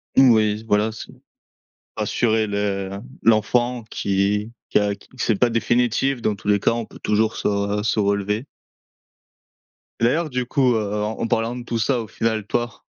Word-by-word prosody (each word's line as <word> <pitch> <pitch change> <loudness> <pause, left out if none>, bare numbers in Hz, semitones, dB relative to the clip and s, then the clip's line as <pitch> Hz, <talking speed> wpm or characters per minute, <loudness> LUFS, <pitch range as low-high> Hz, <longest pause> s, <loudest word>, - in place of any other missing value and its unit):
Mmh, 130 -2 +7
oui, 110 -1 +2
voilà, 105 +1 +2
c'est 110 - -9 0.9
rassurer 110 -2 +1
le 100 -1 -1 0.3
l'enfant, 120 +2 +2
qui 100 +2 0 0.2
qui - - +3
a 100 -1 0
q - - -21
c'est 115 -3 +1
pas 125 - +4
définitif, 120 +3 +1
dans 105 -2 0
tous 100 - -11
les 105 -1 +4
cas, - - +2
on 115 -1 -3
peut - - -15
toujours 110 +1 +1
se 100 0 0
se 110 0 +1
relever. 100 +3 0 1.5
Et - - -3
d'ailleurs 155 +7 +2
du 125 -2 -2
coup, 125 -1 +2
heu, 105 -2 -1
en 110 +2 -2
parlant 115 +1 0
de 125 - -6
tout 120 -1 -3
ça 120 +3 +1
au 110 - -7
final, 110 0 -1
toi, 120 +1 -3
110 Hz, 170 wpm, -22 LUFS, 105-120 Hz, 1.5 s, Mmh